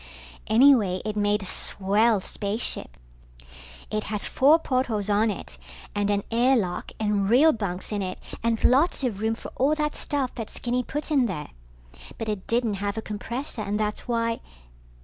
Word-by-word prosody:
Anyway, 220 -5 +5
it 215 -1 -2
made 205 0 +1
a - - -7
swell 205 +4 +2
spaceship. 200 - -3 0.9
It 215 0 -1
had 210 -2 -3
four 290 +5 +4
portholes 245 -9 -1
on 215 +2 +3
it 205 - -6 0.3
and 205 0 0
an 200 -1 +1
air 245 +4 +4
lock 180 -7 -2
and 205 -2 +1
real 290 +7 +6
bunks 195 -4 -4
in 205 -1 -1
it 185 -1 -4 0.2
and 230 -1 0
lots 275 +4 +3
of 225 -6 -1
room 220 +1 +1
for - - -9
all 280 +4 +3
that 300 -1 -1
stuff 280 -4 -2
that 225 -3 -6
Skinny 245 +1 -2
put 295 +5 -5
in 270 -5 +3
there. 150 -7 -5 0.7
But 225 - -4
it 205 -3 -4
didn't 230 -4 0
have 205 +1 -2
a - - -1
compressor 235 +4 -5
and 210 0 -2
that's 210 +2 -2
why 230 -1 0
220 Hz, 170 wpm, -25 LUFS, 205-250 Hz, 0.9 s, real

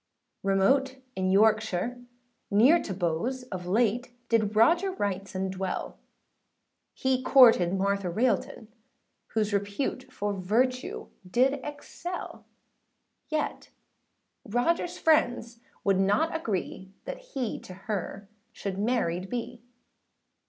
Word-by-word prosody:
Remote 230 +8 +2 0.2
in 185 0 0
Yorkshire, 215 +2 +2 0.5
near 250 +12 +5
to - - -6
Bowes, 190 +9 -1
Of 180 -2 -5
late 235 +5 +1 0.2
did 215 -2 +2
Roger 340 - +4
Wrightson 190 - -3
dwell; 190 -1 -4 1.0
He 260 -1 +1
courted 225 -9 +6
Martha 200 -1 0
Railton, 220 +2 -1 0.7
whose 215 -1 +1
Repute 205 +6 -2
for 205 -4 -2
virtue 235 +7 -1 0.2
did 265 +7 +2
excel; 330 +4 -7 0.8
Yet 310 -1 -2 0.8
Rogerâs 335 +10 0
friends 245 -7 +2 0.2
would 195 -1 +2
not 205 +13 +2
agree, 190 - -3
That - - -5
he 270 - -4
to 185 - -11
her 200 -1 -4 0.2
should 195 -4 -5
married 195 -5 0
be. 240 -1 -5
220 Hz, 105 wpm, -28 LUFS, 195-255 Hz, 1.0 s, courted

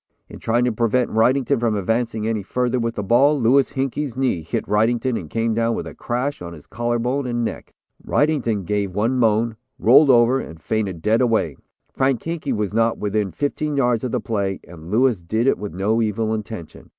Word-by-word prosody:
In - - -10
trying 120 +2 +1
to 125 - +1
prevent 120 +2 +1
Wrightington 130 +4 +2
from 115 -2 +1
advancing 110 +2 -1
any 110 -2 -1
further 125 +5 -1
with 115 0 -2
the 105 - -3
ball, 135 +8 +4
Louis 130 +3 +3
Hinkey's 135 0 -2
knee 130 -10 0
hit 80 - -3
Wrightington 115 +4 +1
and 80 -8 -5
came 115 +3 0
down 115 +1 +1
with - - -4
a - - -8
crash 125 +2 -3
on 85 -1 -7
his 75 -3 -13
collar 120 +1 -2
bone 125 +3 -1
and 120 -1 -1
neck. - - -6 0.3
Wrightington 125 - 0
gave 100 -1 -2
one 115 +5 +1
moan, 115 0 +2 0.2
rolled 140 +6 +6
over 120 +1 +5
and 80 -10 -8
fainted 95 -2 -3
dead 110 +3 +3
away. 110 - +1 0.4
Frank 130 -3 0
Hinkey 165 -4 -3
was 105 -4 -2
not 115 +1 +2
within 105 -1 -1
fifteen 145 - -2
yards 120 -4 +1
of 125 - -2
the - - 0
play, 100 -4 -2
and 85 -1 -11
Louis 115 -1 +2
did 110 +8 -1
it 135 - +2
with 105 -1 -5
no 105 +5 0
evil 110 0 -1
intention. 110 -6 -7
115 Hz, 200 wpm, -21 LUFS, 105-125 Hz, 0.4 s, rolled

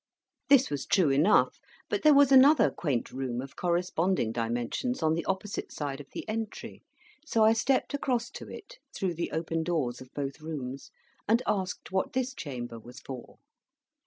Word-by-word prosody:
This 275 - +5
was 145 -2 -3
true 175 -8 +3
enough, 150 +10 +3 0.3
but - - -1
there 305 -2 +6
was 280 -1 +6
another 270 -2 +7
quaint 140 -8 -2
room 130 -2 -3
of 135 +1 -7
corresponding 175 -6 0
dimensions 120 - -2
on 155 0 +3
the 165 0 -1
opposite 195 +1 -3
side 145 -1 -4
of 140 - -14
the - - -7
entry: 220 0 -5 0.4
so 230 -8 +2
I 220 +1 +6
stepped 260 +5 +1
across 250 -3 -1
to - - -9
it, - - -11 0.2
through 185 -3 -1
the 170 +1 -3
open 165 0 -2
doors 150 -8 -1
of 130 - -12
both 140 +1 -4
rooms, 140 -4 -6 0.4
and 230 +4 +3
asked 190 -4 -2
what 190 0 -1
this 260 0 -1
chamber 120 - -6
was 120 +4 -12
for. 130 -2 -9
170 Hz, 170 wpm, -29 LUFS, 135-225 Hz, 0.4 s, another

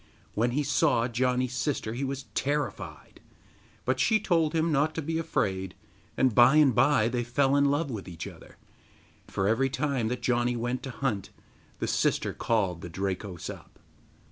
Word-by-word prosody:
When 115 +3 +1
he 140 +5 0
saw 140 -4 +2
Janni's 125 +1 0
sister 125 -3 -2
he 125 +4 -3
was 135 0 -3
terrified, 130 - -3 0.7
but 130 - 0
she 220 -1 +3
told 165 -5 +1
him 165 +1 +2
not 150 +2 +1
to 160 - -2
be 160 +2 -1
afraid, 95 - -1 0.4
and 130 -3 +3
by 120 +5 +6
and 150 -4 +6
by 125 -2 +4
they 120 +1 -1
fell 135 +3 +2
in 140 0 +4
love 145 +1 +1
with 105 -5 -6
each 85 -1 -7
other, - - -12 0.7
for 95 0 -1
every 115 +5 +2
time 135 -4 -1
that 125 +2 -3
Janni 120 0 +1
went 120 +2 -2
to 135 - -6
hunt 120 -6 -2 0.5
the - - -2
sister - - 0
called 95 -7 0
the 90 - -7
Drakos 95 0 -4
up. - - -10
125 Hz, 170 wpm, -28 LUFS, 110-140 Hz, 0.7 s, by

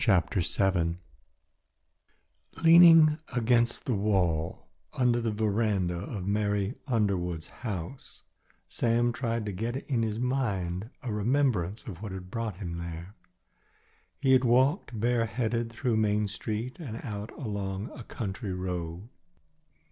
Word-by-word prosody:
CHAPTER 95 -3 +2
VII 85 -1 +1 1.7
Leaning 165 -2 +8
against 120 -1 +2
the 125 - 0
wall 90 -6 0 0.3
under 120 -2 +2
the 115 - 0
veranda 105 -4 0
of 95 +1 -5
Mary 105 +1 0
Underwood's 95 - 0
house, 105 +2 -6 0.4
Sam 120 0 +1
tried 115 -3 -2
to 105 - -3
get 115 +6 -3
in 125 -5 +1
his 110 -1 -1
mind 110 -7 -1
a 120 -5 -3
remembrance 110 -4 +1
of 95 -4 -8
what 105 -3 -5
had 95 -1 -8
brought 115 -5 -3
him 85 -4 -5
there. 85 +2 -7 1.1
He 135 -1 +4
had 130 0 +5
walked 125 - +2
bareheaded 115 0 0
through 120 -1 0
Main 105 -1 +2
Street 110 - -4
and 120 -9 -6
out 105 -3 -5
along 100 -3 -4
a 120 - -9
country 105 -3 -5
road. 90 +1 -4
110 Hz, 125 wpm, -29 LUFS, 95-120 Hz, 1.7 s, Leaning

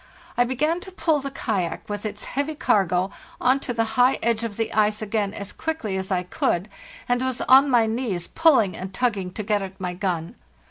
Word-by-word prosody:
I 245 - +3
began 300 +7 0
to 380 +1 -10
pull 320 -4 +1
the 275 0 -4
kayak, 195 -9 -2
with 205 +1 -3
its 210 0 -5
heavy 285 +3 -2
cargo, 190 - +2 0.3
on 255 +2 +3
to 270 - -4
the 230 -1 +1 0.2
high 255 +2 +5
edge 230 0 +1
of 220 -3 -4
the 225 - -2
ice 215 0 +2
again 210 -2 -1
as 200 -1 -7
quickly 315 -12 -3
as 190 0 -3
I 180 -1 +1
could, 180 +1 -1 0.4
and 245 0 +1
was 260 0 -1
on 270 +2 +6
my 240 -3 +4
knees 220 -6 -2
pulling 270 - +3
and 185 +1 -6
tugging 200 -6 0
to 215 - -4
get 205 0 +1
at 190 0 -7
my 180 -1 -3
gun. 175 -3 -2
220 Hz, 205 wpm, -24 LUFS, 195-260 Hz, 0.4 s, on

